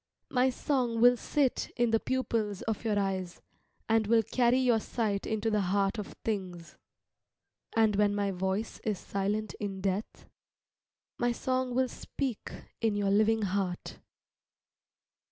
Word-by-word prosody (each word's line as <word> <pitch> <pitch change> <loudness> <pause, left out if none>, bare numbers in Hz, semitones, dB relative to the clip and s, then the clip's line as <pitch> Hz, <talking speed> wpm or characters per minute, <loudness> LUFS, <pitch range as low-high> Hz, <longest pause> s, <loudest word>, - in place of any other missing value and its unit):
My 255 0 +3
song 250 -3 0
will 245 +1 +7
sit 270 +2 0
in 240 -2 +2
the 225 - +3
pupils 225 -7 -1
of 220 -1 -2
your 215 -2 +1
eyes, 190 -3 -2 0.5
and 225 -1 +2
will 225 0 +4
carry 245 +3 +2
your 250 -3 +3
sight 210 -3 -2
into 220 0 0
the 210 -1 +2
heart 195 +3 +1
of 205 - -6
things. 185 -6 -4 1.0
And 220 -2 +4
when 205 0 +3
my 200 -1 0
voice 190 +4 -2
is 215 -3 -1
silent 200 +3 -2
in 200 -2 -4
death, 195 +2 -3 0.9
my 240 0 +2
song 255 0 -1
will 260 0 +3
speak 255 -1 -5 0.3
in 225 -2 +1
your 200 -1 +1
living 215 +2 +3
heart. 190 -2 -2
215 Hz, 140 wpm, -30 LUFS, 200-235 Hz, 1.0 s, will